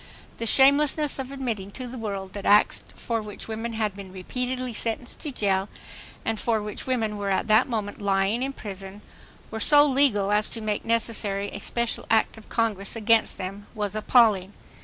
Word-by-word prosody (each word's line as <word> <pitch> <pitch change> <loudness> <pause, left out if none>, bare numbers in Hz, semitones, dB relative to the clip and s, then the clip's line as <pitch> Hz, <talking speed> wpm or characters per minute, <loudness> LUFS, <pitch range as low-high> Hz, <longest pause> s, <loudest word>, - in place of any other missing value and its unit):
The 230 - -3
shamelessness 280 +3 +4
of 265 0 -5
admitting 235 -8 -4
to 255 - -6
the 245 0 -7
world 200 -3 -5
that 200 - -6
acts 205 +1 +4
for 230 -2 -2
which 210 -2 -8
women 225 +1 -4
had 215 -3 -1
been 195 -2 -9
repeatedly 250 +6 -4
sentenced 230 +3 -3
to 300 - -5
jail, 195 -4 0 0.6
and 225 -1 -1
for 230 -2 +1
which 210 +3 -6
women 225 -5 -1
were 200 -1 -2
at 190 - 0
that 215 +3 +5
moment 215 -3 -3
lying 200 +3 +1
in 270 +1 -1
prison, 195 -3 -8 0.5
were 220 - -4
so 290 +6 +6
legal 260 -8 +3
as 210 0 +2
to 230 - -4
make 215 -1 -2
necessary 215 -3 +1
a - - -6
special 235 +3 -2
act 225 0 +2
of 220 - -15
Congress 215 -4 -1
against 225 0 +2
them, 195 +2 -6
was 205 -1 -3
appalling. 215 -4 +3
220 Hz, 180 wpm, -25 LUFS, 200-240 Hz, 0.6 s, so